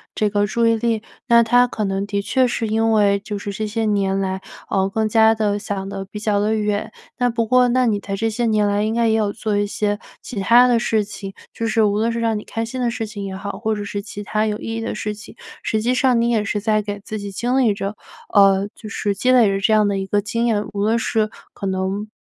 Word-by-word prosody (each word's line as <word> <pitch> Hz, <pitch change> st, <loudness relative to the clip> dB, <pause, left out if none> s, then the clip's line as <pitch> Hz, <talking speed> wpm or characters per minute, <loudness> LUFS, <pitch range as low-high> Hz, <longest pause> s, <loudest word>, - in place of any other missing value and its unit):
这 210 Hz, -, +1 dB
个 205 Hz, 0 st, +1 dB
注 230 Hz, +3 st, +1 dB
意 230 Hz, 0 st, +3 dB
力。 225 Hz, -1 st, -1 dB, 0.2 s
那 235 Hz, -2 st, +6 dB
他 245 Hz, +2 st, +4 dB
可 220 Hz, -, -4 dB
能 195 Hz, 0 st, -1 dB
的 200 Hz, -1 st, -1 dB
确 255 Hz, +5 st, +2 dB
是 230 Hz, -2 st, -2 dB
因 225 Hz, +1 st, +1 dB
为 200 Hz, -2 st, +3 dB
就 205 Hz, +1 st, -5 dB
是 200 Hz, 0 st, -5 dB
这 215 Hz, +2 st, -3 dB
些 225 Hz, +2 st, -2 dB
年 200 Hz, -2 st, +1 dB
来， 190 Hz, -1 st, -2 dB, 0.3 s
呃， 195 Hz, -1 st, +1 dB
更 220 Hz, +2 st, 0 dB
加 220 Hz, 0 st, +5 dB
地 205 Hz, -2 st, 0 dB
想 195 Hz, -1 st, -4 dB
得 195 Hz, -1 st, -5 dB
比 210 Hz, +2 st, -8 dB
较 210 Hz, -1 st, +1 dB
地 210 Hz, +2 st, +1 dB
远， 210 Hz, -1 st, -1 dB, 0.3 s
那 245 Hz, -1 st, +2 dB
不 230 Hz, -1 st, 0 dB
过 250 Hz, +2 st, +4 dB
那 250 Hz, +1 st, +2 dB
你 210 Hz, -3 st, +1 dB
在 195 Hz, -, -4 dB
这 225 Hz, +3 st, 0 dB
些 235 Hz, +2 st, -1 dB
年 215 Hz, -2 st, +2 dB
来 205 Hz, 0 st, +1 dB
应 220 Hz, +1 st, 0 dB
该 235 Hz, -1 st, +2 dB
也 220 Hz, -, +3 dB
有 210 Hz, -2 st, 0 dB
做 215 Hz, -1 st, -2 dB
一 205 Hz, 0 st, +1 dB
些 205 Hz, 0 st, -1 dB, 0.2 s
其 235 Hz, -, -6 dB
它 240 Hz, +5 st, +6 dB
的 240 Hz, -2 st, +3 dB
事 220 Hz, -2 st, +1 dB
情， 200 Hz, -1 st, -8 dB, 0.2 s
就 230 Hz, -, -3 dB
是 225 Hz, 0 st, +2 dB
无 205 Hz, -1 st, +2 dB
论 225 Hz, +2 st, +1 dB
是 230 Hz, -, -2 dB
让 225 Hz, -2 st, 0 dB
你 -, -, -11 dB
开 225 Hz, -, -3 dB
心 235 Hz, +3 st, -5 dB
的 245 Hz, -1 st, +1 dB
事 230 Hz, -1 st, -3 dB
情 205 Hz, -2 st, -7 dB
也 190 Hz, -1 st, -5 dB
好， 200 Hz, +1 st, -5 dB
或 220 Hz, -1 st, 0 dB
者 205 Hz, -, -4 dB
是 205 Hz, 0 st, -4 dB
其 205 Hz, 0 st, -8 dB
它 215 Hz, +2 st, 0 dB
有 210 Hz, -1 st, -1 dB
意 225 Hz, -, -5 dB
义 -, -, -3 dB
的 225 Hz, -1 st, -3 dB
事 210 Hz, 0 st, -3 dB
情， 210 Hz, +2 st, -12 dB, 0.3 s
实 215 Hz, -1 st, 0 dB
际 245 Hz, +3 st, +1 dB
上 255 Hz, -2 st, +3 dB
你 235 Hz, -, +1 dB
也 220 Hz, -3 st, +1 dB
是 205 Hz, +1 st, -2 dB
在 215 Hz, 0 st, +2 dB
给 205 Hz, 0 st, -5 dB
自 215 Hz, +1 st, -5 dB
己 200 Hz, 0 st, -6 dB
经 245 Hz, +6 st, -1 dB
历 235 Hz, -5 st, +3 dB
着， 200 Hz, +1 st, -4 dB, 0.4 s
呃， 195 Hz, -1 st, +5 dB
就 215 Hz, -, -10 dB
是 205 Hz, 0 st, -2 dB
积 250 Hz, +6 st, +2 dB
累 245 Hz, -4 st, +6 dB
着 195 Hz, 0 st, 0 dB
这 205 Hz, +3 st, +2 dB
样 215 Hz, -1 st, +4 dB
的 200 Hz, -, 0 dB
一 195 Hz, -, -2 dB
个 205 Hz, +1 st, +1 dB
经 230 Hz, +3 st, -1 dB
验， 215 Hz, -3 st, +1 dB
无 200 Hz, -, -2 dB
论 220 Hz, +2 st, +2 dB
是 220 Hz, -1 st, 0 dB, 0.2 s
可 -, -, -7 dB
能 190 Hz, +2 st, -2 dB
215 Hz, 290 characters per minute, -20 LUFS, 205-230 Hz, 0.4 s, 那